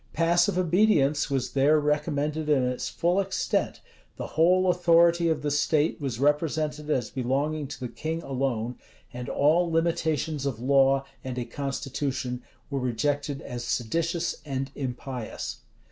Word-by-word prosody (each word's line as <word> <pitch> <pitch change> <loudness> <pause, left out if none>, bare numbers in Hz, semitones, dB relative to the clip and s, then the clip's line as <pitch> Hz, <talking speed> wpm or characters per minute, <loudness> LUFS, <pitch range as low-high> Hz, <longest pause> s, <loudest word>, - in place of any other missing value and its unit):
Passive 170 +2 +2
obedience 170 -6 +3
was 135 -2 -1
there 145 +3 +4
recommended 150 +1 -1
in 140 -4 +4
its 125 0 -2
full 175 +3 +1
extent, 195 -1 -1 0.4
the - - -4
whole 180 +4 +4
authority 170 -1 +4
of 155 -2 -1
the 145 - 0
state 150 +1 +1
was 130 -5 -3
represented 150 +1 0
as 125 -7 0
belonging 140 +4 -1
to - - -8
the 125 - -3
king 160 +7 -4
alone, 125 -3 -2 0.3
and 125 0 -6
all 165 +5 +3
limitations 160 -3 0
of 125 -5 -3
law 135 +1 +3 0.2
and 130 -1 -5
a 125 - -2
constitution 135 -1 -3 0.3
were 140 - -1
rejected 140 +3 -1
as 120 -2 -6
seditious 165 +9 -1
and 135 -2 -3
impious. 125 -2 -5
145 Hz, 140 wpm, -27 LUFS, 130-160 Hz, 0.4 s, there